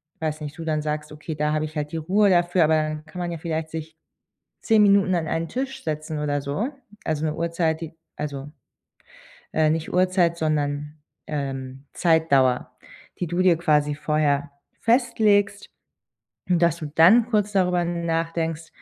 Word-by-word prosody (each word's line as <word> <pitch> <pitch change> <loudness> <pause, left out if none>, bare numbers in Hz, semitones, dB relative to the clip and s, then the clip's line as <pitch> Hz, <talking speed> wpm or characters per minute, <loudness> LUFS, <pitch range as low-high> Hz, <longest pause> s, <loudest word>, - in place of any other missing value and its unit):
ich - - -46
weiß 155 -1 -2
nicht, 150 +1 -7
du 165 - -6
dann 155 -1 0
sagst: 150 0 -4
„Okay, 155 +1 -6
da 150 0 0
habe 155 0 0
ich 155 +1 -9
halt 150 0 -3
die - - -1
Ruhe 195 +6 +3
dafür.“ 175 -1 +3
Aber 160 +1 +3
dann 155 0 -2
kann 170 +3 -9
man 175 -1 -2
ja 170 - -4
vielleicht 160 -1 -3
sich 160 0 -7 0.6
10 220 -2 +4
Minuten 200 -2 +4
an 165 -2 -1
einen 165 +1 -1
Tisch 265 +1 -4
setzen 155 0 -3
oder 145 -1 -1
so. 145 - -2 0.4
Also 155 -1 -1
'ne 155 0 -1
Uhrzeit, 165 -1 -1
die 160 -1 -6 0.2
also, 145 -1 -5 1.0
äh, 155 -1 +3
nicht 160 +1 -2
Uhrzeit, 180 -2 +2
sondern, 150 -1 -1 0.3
ähm, 135 -2 -5
Zeitdauer, 140 -7 +2 0.5
die 180 - -1
du 175 +2 -2
dir 180 -3 +4
quasi 150 -3 +2
vorher 145 -1 0 0.3
festlegst, 215 -4 +2 0.8
dass 170 -3 +3
du 155 - -5
dann 215 +9 +6
kurz 210 -2 +1
darüber 180 -3 +2
nachdenkst, 165 -1 -2
160 Hz, 165 wpm, -24 LUFS, 150-175 Hz, 1.0 s, dann